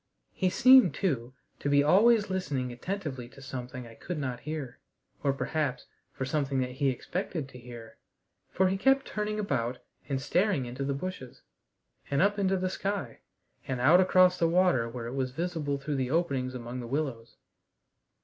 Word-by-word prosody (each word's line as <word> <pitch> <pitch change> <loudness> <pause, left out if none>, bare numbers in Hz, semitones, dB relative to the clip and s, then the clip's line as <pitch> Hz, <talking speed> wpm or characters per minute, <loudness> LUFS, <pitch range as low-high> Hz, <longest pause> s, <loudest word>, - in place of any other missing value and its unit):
He 185 - 0
seemed, 255 +7 +6
too, 130 - -2 0.2
to 145 - -2
be 145 0 +5
always 205 +6 +5
listening 140 -10 -2
attentively 135 -3 -5
to 130 - -16
something 125 -1 -7
I 115 - -12
could 175 +8 -6
not 130 -4 -3
hear, 150 -5 -6 0.4
or 140 - +2
perhaps 140 -1 -2 0.3
for 130 - -4
something 140 -1 0
that 125 0 -2
he 135 +2 +1
expected 160 +3 -3
to 125 - -12
hear, 120 -2 -11 0.5
for 190 +1 +2
he 190 +1 0
kept 270 +4 +3
turning 210 0 -3
about 125 - -1 0.3
and 135 -2 0
staring 180 -1 +1
into 125 +3 -5
the 140 0 -1
bushes, 140 -5 -7 0.7
and 140 - +1
up 205 +2 +3
into 195 -1 +2
the 185 0 -1
sky, 195 - -3 0.5
and 130 -2 -2
out 155 +9 +6
across 185 -1 +4
the 165 - +3
water 170 -10 +3
where 115 0 -6
it 120 - -5
was 130 -1 -1
visible 155 -1 -2
through 140 +1 -3
the 130 -1 -1
openings 135 -5 0
among 120 +1 -6
the 120 - -6
willows. 130 -4 -3
140 Hz, 175 wpm, -29 LUFS, 125-185 Hz, 0.7 s, seemed